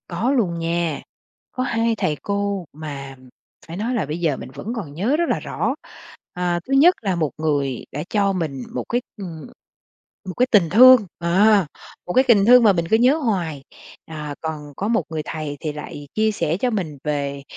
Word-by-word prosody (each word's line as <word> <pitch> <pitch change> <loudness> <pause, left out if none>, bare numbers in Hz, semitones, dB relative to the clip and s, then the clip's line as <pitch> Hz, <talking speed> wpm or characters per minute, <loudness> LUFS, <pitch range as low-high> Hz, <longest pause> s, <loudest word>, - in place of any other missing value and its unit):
Có 195 +9 -1
luôn 190 -11 0
nha. 165 -2 -1 0.5
Có 255 - -2
hai 230 -2 0
thầy 155 -7 -1
cô 200 -2 -2
mà 140 -3 -7 0.5
phải 165 +2 -7
nói 230 +5 -2
là 225 -9 0
bây 150 +3 -4
giờ 155 -6 0
mình - - -8
vẫn 225 - -5
còn 175 -11 -6
nhớ 210 - 0
rất 340 0 0
là - - +1
rõ, - - -2 0.6
à, 175 -1 -1
thứ 270 - -2
nhất 330 +7 +6
là 195 -4 -1
một 155 -5 -1
người 145 -5 -1
đã 150 - -4
cho 200 -2 +1
mình 155 -8 -3
một 125 - -3
cái, 245 +1 0 0.2
ừm, 165 -7 -8 0.8
một - - -4
cái 250 - +3
tình 195 -8 +4
thương, 250 +1 +8
ờ, 195 +3 +4 0.4
một 180 - -2
cái 260 - +5
tình 210 -5 +5
thương 245 +1 +7
mà 210 -3 +6
mình 170 -2 -1
cứ 220 - +5
nhớ 255 +6 +4
hoài, 180 - -2 0.4
à, 150 -2 -6
còn 150 -2 -6
có 200 - -2
một 230 0 +1
người 160 -1 -3
thầy 155 -2 -5
thì 155 - -3
lại 145 -1 -8
chia 220 0 +2
sẻ 165 -5 -1
cho 250 +5 0
mình 180 -10 -3
về, 140 -2 -3
175 Hz, 200 wpm, -21 LUFS, 155-220 Hz, 0.8 s, thương